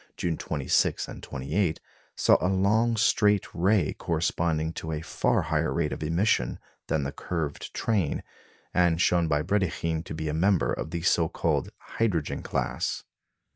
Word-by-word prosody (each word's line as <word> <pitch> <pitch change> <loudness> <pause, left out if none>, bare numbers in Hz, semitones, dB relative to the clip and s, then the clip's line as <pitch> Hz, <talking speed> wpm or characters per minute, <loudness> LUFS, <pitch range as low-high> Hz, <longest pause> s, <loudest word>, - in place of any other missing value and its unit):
June 85 -2 -1
26 75 -4 0
and - - -9
28, 80 +6 -1 0.4
saw - - +5
a 90 - +2
long 110 +5 +2
straight 105 -2 +3
ray 90 0 +2
corresponding 80 -1 -1
to 80 - -5
a 75 -1 -3
far - - +1
higher 80 +1 0
rate 80 -3 0
of - - -7
emission 80 - +1 0.3
than 80 -3 0
the 70 - -3
curved 80 -4 -4
train, 100 -10 0 0.5
and 85 -2 +3
shown 85 -1 +3
by 75 -1 +1
Brédikhine 85 -3 0
to - - -6
be 80 0 -3
a 75 - -1
member 90 +2 +2
of - - -4
the 85 0 -4
(so 85 -3 +3
called) - - 0
hydrogen 90 -10 -2
class. - - -2
85 Hz, 155 wpm, -27 LUFS, 80-95 Hz, 0.5 s, saw